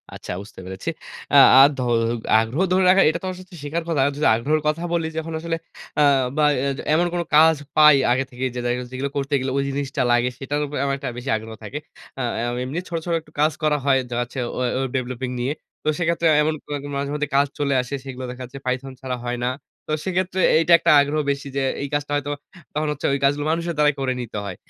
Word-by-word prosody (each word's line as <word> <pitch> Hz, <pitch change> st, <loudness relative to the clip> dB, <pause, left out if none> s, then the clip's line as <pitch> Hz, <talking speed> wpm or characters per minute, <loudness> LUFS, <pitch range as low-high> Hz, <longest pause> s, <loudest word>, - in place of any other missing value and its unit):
আচ্ছা -, -, -7 dB
বুঝতে 100 Hz, -1 st, -13 dB
পেরেছি। 95 Hz, -, -5 dB, 0.4 s
আ -, -, +5 dB, 0.2 s
আ -, -, +11 dB, 0.2 s
ধ -, -, -7 dB, 0.6 s
আগ্রহ 120 Hz, +10 st, -2 dB
ধরে 185 Hz, +1 st, +3 dB
রাখার 190 Hz, +1 st, +6 dB
এটা 165 Hz, -, -1 dB
তো -, -, -6 dB
আমার 185 Hz, 0 st, -5 dB
সাথে 185 Hz, -1 st, -14 dB
শিখার 165 Hz, +3 st, -2 dB
কথা। 150 Hz, -5 st, +1 dB
যদি 150 Hz, -, +1 dB
আগ্রহের 150 Hz, +7 st, 0 dB
কথা 155 Hz, +3 st, 0 dB
বলি 165 Hz, -2 st, 0 dB
যখন 160 Hz, 0 st, -4 dB
আসলে 165 Hz, 0 st, -2 dB, 0.4 s
অ্যা 150 Hz, -, +5 dB, 0.3 s
বা 150 Hz, -, +4 dB, 0.2 s
এজ 140 Hz, 0 st, -2 dB, 0.2 s
এমন 175 Hz, +2 st, +3 dB
কোন 175 Hz, -, 0 dB
কাজ 160 Hz, +1 st, +7 dB, 0.2 s
পাই 150 Hz, -2 st, +8 dB, 0.2 s
আগে 130 Hz, +2 st, +2 dB
থেকেই 130 Hz, +1 st, -2 dB
যে 125 Hz, -, -2 dB
দেখা 120 Hz, 0 st, 0 dB
যাচ্ছে 125 Hz, 0 st, -9 dB
যেগুলো 135 Hz, +2 st, -3 dB
করতে 140 Hz, +1 st, -2 dB
গেলে 130 Hz, 0 st, -2 dB
ওই 140 Hz, -, +1 dB
জিনিসটা 140 Hz, 0 st, -2 dB
লাগে 120 Hz, +1 st, +3 dB
সেটার 145 Hz, +2 st, -2 dB
উপরে 145 Hz, -1 st, -5 dB
আমার 140 Hz, 0 st, 0 dB
একটা 135 Hz, -2 st, -4 dB
বেশি 125 Hz, +2 st, -5 dB
আগ্রহ 110 Hz, 0 st, -9 dB
থাকে। 140 Hz, +8 st, -5 dB, 0.4 s
আ -, -, -1 dB, 0.2 s
অ্যা 120 Hz, +1 st, -1 dB
এমনি 140 Hz, +7 st, -3 dB
ছোট, 170 Hz, -, -3 dB
ছোট 170 Hz, -, -1 dB
একটু 150 Hz, -, -22 dB
কাজ 155 Hz, +1 st, +4 dB
করা 150 Hz, -1 st, +3 dB
হয় 135 Hz, -1 st, +4 dB
যা 120 Hz, -, -4 dB
হচ্ছে 120 Hz, +2 st, -6 dB, 0.2 s
ওয়ে 125 Hz, -1 st, 0 dB
ওয়েব 135 Hz, -1 st, -2 dB
ডেভেলপিং 125 Hz, 0 st, -4 dB
নিয়ে। 130 Hz, +4 st, -1 dB, 0.3 s
তো -, -, -7 dB
সেইক্ষেত্রে 170 Hz, -1 st, +1 dB
এমন 155 Hz, +1 st, +1 dB
কোনো -, -, -7 dB
এরকম 145 Hz, +1 st, -7 dB
মাঝে 140 Hz, 0 st, -2 dB
মধ্যে 150 Hz, -1 st, -2 dB
কাজ 140 Hz, +1 st, +4 dB
চলে 140 Hz, -1 st, +1 dB
আসে 125 Hz, +3 st, -5 dB
সেগুলো 130 Hz, -1 st, -6 dB
দেখা 125 Hz, -, -9 dB
যাচ্ছে 135 Hz, +3 st, -9 dB
python 130 Hz, +1 st, -2 dB
ছাড়া 130 Hz, -1 st, -3 dB
হয় 120 Hz, 0 st, -2 dB
না। 125 Hz, -, +1 dB, 0.4 s
তো -, -, -4 dB
সেইক্ষেত্রে 185 Hz, 0 st, -1 dB, 0.2 s
এইটা 165 Hz, +1 st, +4 dB
একটা 170 Hz, -, +3 dB
আগ্রহ 145 Hz, +2 st, 0 dB
বেশি 140 Hz, 0 st, -4 dB
যে -, -, +1 dB, 0.2 s
এই -, -, -2 dB
কাজটা 145 Hz, 0 st, -2 dB
হয়তোবা 145 Hz, 0 st, -2 dB, 0.4 s
তখন 155 Hz, +1 st, -1 dB
হচ্ছে 150 Hz, -, -5 dB
ওই 140 Hz, -, 0 dB
কাজগুলো 145 Hz, +2 st, +2 dB
মানুষের 170 Hz, 0 st, -2 dB
দ্বারাই 150 Hz, -1 st, +4 dB
করে 130 Hz, -1 st, 0 dB
নিতে 110 Hz, -3 st, -6 dB
হয়। 95 Hz, -, -5 dB
140 Hz, 235 wpm, -22 LUFS, 130-155 Hz, 0.6 s, আ